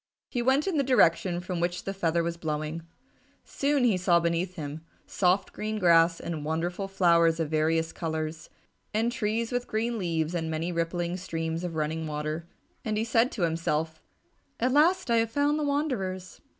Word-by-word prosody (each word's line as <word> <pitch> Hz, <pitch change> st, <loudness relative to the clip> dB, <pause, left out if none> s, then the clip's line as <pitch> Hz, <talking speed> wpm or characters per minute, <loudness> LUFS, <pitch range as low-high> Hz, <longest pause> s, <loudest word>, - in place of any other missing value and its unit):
He 245 Hz, -, -1 dB
went 265 Hz, +4 st, +3 dB
in 375 Hz, -5 st, 0 dB
the 280 Hz, -, +3 dB
direction 175 Hz, -8 st, +3 dB
from 180 Hz, -1 st, -4 dB
which 175 Hz, +1 st, -1 dB
the 195 Hz, -, -3 dB
feather 170 Hz, -3 st, 0 dB
was 170 Hz, 0 st, -2 dB
blowing. 155 Hz, 0 st, -3 dB, 0.6 s
Soon 280 Hz, -1 st, 0 dB
he 225 Hz, -6 st, +3 dB
saw 175 Hz, -1 st, +3 dB
beneath 170 Hz, +2 st, -1 dB
him 150 Hz, -1 st, -6 dB, 0.2 s
soft 185 Hz, +1 st, +1 dB
green 215 Hz, 0 st, -3 dB
grass 165 Hz, -3 st, +4 dB
and 160 Hz, -3 st, -4 dB
wonderful 175 Hz, +5 st, -2 dB
flowers 170 Hz, -4 st, +3 dB
of 160 Hz, -2 st, -2 dB
varied 160 Hz, +1 st, +1 dB
colours, 160 Hz, -1 st, -4 dB, 0.5 s
and 225 Hz, +2 st, +2 dB
trees 230 Hz, 0 st, -1 dB
with 245 Hz, 0 st, -2 dB
green 225 Hz, +1 st, -1 dB
leaves 165 Hz, -3 st, -1 dB
and 165 Hz, -2 st, -2 dB
many 160 Hz, +2 st, -2 dB
rippling 170 Hz, +1 st, -2 dB
streams 165 Hz, -2 st, -3 dB
of 175 Hz, -2 st, -4 dB
running 160 Hz, +1 st, -2 dB
water. 155 Hz, +2 st, -4 dB, 0.4 s
And 215 Hz, -1 st, -1 dB
he 220 Hz, -, +1 dB
said 230 Hz, +2 st, +2 dB
to 195 Hz, -, -2 dB
himself, 160 Hz, -1 st, -1 dB, 0.6 s
"At 250 Hz, +2 st, +2 dB
last 335 Hz, 0 st, +3 dB
I 230 Hz, -, +4 dB
have 225 Hz, 0 st, +2 dB
found 290 Hz, +4 st, +1 dB
the -, -, -1 dB
wanderers." 230 Hz, -, -2 dB
175 Hz, 175 wpm, -28 LUFS, 165-225 Hz, 0.6 s, grass